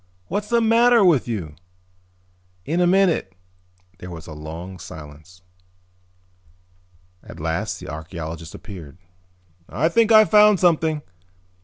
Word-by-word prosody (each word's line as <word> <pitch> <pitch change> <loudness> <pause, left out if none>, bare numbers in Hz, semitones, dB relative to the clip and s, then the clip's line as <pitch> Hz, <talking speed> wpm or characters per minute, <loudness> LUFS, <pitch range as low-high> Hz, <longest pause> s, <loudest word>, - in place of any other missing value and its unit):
"What's 210 0 -3
the 235 0 +2
matter 230 -1 +4
with 155 -10 +3
you?" 95 -10 -4 1.1
"In 170 +4 0
a 175 - +3
minute." 180 - +2 0.6
There 90 - -9
was 85 -1 -9
a 80 - -9
long 80 +5 -9
silence. 80 +4 -12 1.8
At - - -12
last 80 +1 -3
the - - -10
archeologist 80 0 -7
appeared. 85 -7 -11 0.7
"I 160 +5 0
think 230 +5 +2
I've 215 -1 +6
found 210 -2 +6
something. 160 -3 +1
105 Hz, 120 wpm, -22 LUFS, -, 1.8 s, I've